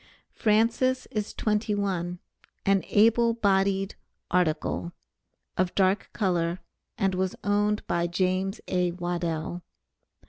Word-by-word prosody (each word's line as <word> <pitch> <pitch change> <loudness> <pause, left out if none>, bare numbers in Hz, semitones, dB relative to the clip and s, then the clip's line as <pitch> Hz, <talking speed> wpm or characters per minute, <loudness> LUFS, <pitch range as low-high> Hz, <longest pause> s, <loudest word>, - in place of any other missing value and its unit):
Francis 230 +4 +2
is 215 -4 -2
twenty 210 0 0
one, 180 -3 -2 0.5
an 195 -1 +3
able 230 +2 +4
bodied 195 -2 +2 0.4
"article," 170 0 0 0.6
of 185 -1 0
dark 190 +1 +2
color, 175 -4 0 0.4
and 195 -1 +1
was 185 0 -1
owned 205 +1 +1
by 170 0 0
James 185 +2 0
A. 180 -1 +1
Waddell. 175 -1 -3
190 Hz, 105 wpm, -27 LUFS, 175-210 Hz, 0.6 s, able